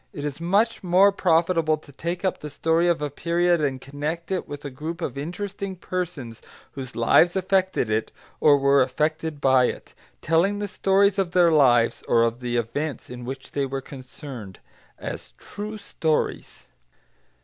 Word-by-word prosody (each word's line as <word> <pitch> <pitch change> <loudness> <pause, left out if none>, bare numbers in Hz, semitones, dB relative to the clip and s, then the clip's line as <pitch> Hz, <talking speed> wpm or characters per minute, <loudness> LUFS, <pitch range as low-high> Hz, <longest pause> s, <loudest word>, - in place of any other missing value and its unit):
It 145 -5 -5
is 145 +2 -5
much 205 +6 +1
more 185 +3 +5
profitable 165 -3 +2
to 150 -1 -17
take 170 +6 -4
up 185 - 0
the 150 - -7
story 165 +4 +1
of 170 -3 +1
a 145 - -2
period 170 +2 +1
and 135 -3 -1
connect 150 +6 -5
it 185 - -2
with 145 0 -8
a 140 - -5
group 160 +6 -6
of 140 -7 -4
interesting 190 +6 -5
persons 170 -11 -5 0.3
whose 130 -3 -8
lives 165 +10 +4
affected 190 - +1
it 110 +1 -1 0.3
or 145 -2 +6
were 140 0 +4
affected 155 +4 -1
by 130 -2 +4
it, - - -5 0.3
telling 170 +6 +2
the 205 0 -3
stories 195 +1 +2
of 180 -3 -1
their 175 -2 +5
lives, 125 -6 +4
or 115 -1 +4
of 115 +1 0
the 120 -1 -2
events 130 +6 -3
in 125 -1 -7
which 135 +1 -7
they 140 -1 -1
were 135 +1 -3
concerned, 130 - -10 0.4
as - - -7
"true 210 +1 -7
stories." 160 -6 -2
155 Hz, 170 wpm, -24 LUFS, 135-180 Hz, 0.4 s, or